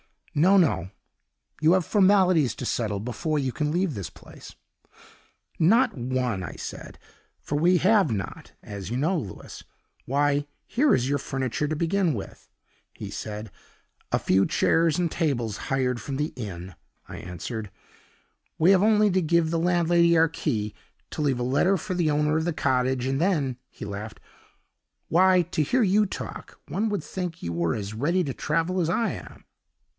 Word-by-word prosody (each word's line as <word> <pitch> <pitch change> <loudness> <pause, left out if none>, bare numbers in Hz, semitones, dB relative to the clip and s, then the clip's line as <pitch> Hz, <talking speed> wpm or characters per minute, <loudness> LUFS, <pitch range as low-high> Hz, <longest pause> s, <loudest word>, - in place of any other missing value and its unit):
No, 180 +7 +4
no, 115 - +2 0.7
you 160 +3 +5
have 185 -3 +2
formalities 185 - +4
to - - -6
settle 105 -4 -1
before 125 +7 -2
you 135 -3 0
can 150 +3 -2
leave 175 +1 0
this 100 - -5
place.' - - -14 1.0
'Not 225 +8 +4
one,' 125 -5 -2
I 85 - -6
said - - -8 0.4
for 145 - -3
we 175 +4 +4
have 195 - +4
not, 100 -3 -5
as 100 -2 -7
you 120 - -3
know, 165 +7 +1
Louis? 110 -11 -7 0.4
'Why, 145 +2 +1 0.2
here 280 +3 +3
is 125 +2 -1
your 145 - +2
furniture 130 +2 -2
to 155 - -2
begin 170 +1 +1
with,' 100 -5 -8 0.5
he - - -7
said. 105 -1 -6 0.6
'A - - +2
few 95 +1 +3
chairs 165 -2 +2
and 175 -3 0
tables 120 -10 -1
hired 125 -3 0
from 135 +4 -5
the 150 +3 -2
inn,' 95 -5 -6 0.4
I - - -7
answered; 105 +5 -6 0.9
'we 170 +4 +5
have 190 -2 +5
only 210 -1 +4
to 185 +1 +2
give 165 0 +2
the 165 - +1
landlady 170 0 +3
our 165 0 +4
key, 105 -9 -2 0.4
to - - -4
leave 135 -4 +1
a - - -1
letter 140 +10 +2
for 185 +3 -4
the 175 -3 +1
owner 150 +1 +2
of 160 - -1
the 175 - 0
cottage, 130 -3 0
and 135 +1 0
then 150 -8 +1
' - - -53
He - - -11
laughed. 105 +2 -7 0.9
'Why, 185 +2 +5
to - - 0
hear 245 - +2
you 210 +2 +3
talk, 200 - -7
one 215 +3 0
would 205 -6 -2
think 180 -2 -5
you 85 - -3
were 85 -1 0
as 100 0 -5
ready 165 +11 +1
to 140 -5 -3
travel 170 +7 -1
as 165 -2 +1
I 225 +6 +1
am! - - -10
150 Hz, 175 wpm, -25 LUFS, 120-180 Hz, 1.0 s, you